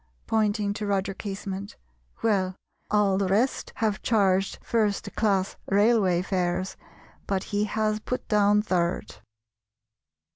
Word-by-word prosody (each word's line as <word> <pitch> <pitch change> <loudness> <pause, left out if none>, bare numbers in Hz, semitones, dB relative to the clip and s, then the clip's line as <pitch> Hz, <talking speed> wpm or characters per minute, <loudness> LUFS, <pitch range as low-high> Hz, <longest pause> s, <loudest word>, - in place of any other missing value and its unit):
(pointing 210 -2 +1
to 210 0 -4
Roger 195 -1 0
Casement), 195 0 -6 0.5
"Well, 190 -4 +1 0.3
all 205 -2 +3
the 195 - +1
rest 220 +8 +1
have 215 -2 0
charged 195 -3 +2
first 215 -3 0
class 195 -3 +1
railway 200 -3 +3
fares, 185 0 -1 0.5
but 195 -2 0
he 205 +1 +2
has 215 0 0
put 250 +4 -4
down 210 0 +4
third." 175 -4 -1
200 Hz, 115 wpm, -26 LUFS, 190-215 Hz, 0.5 s, down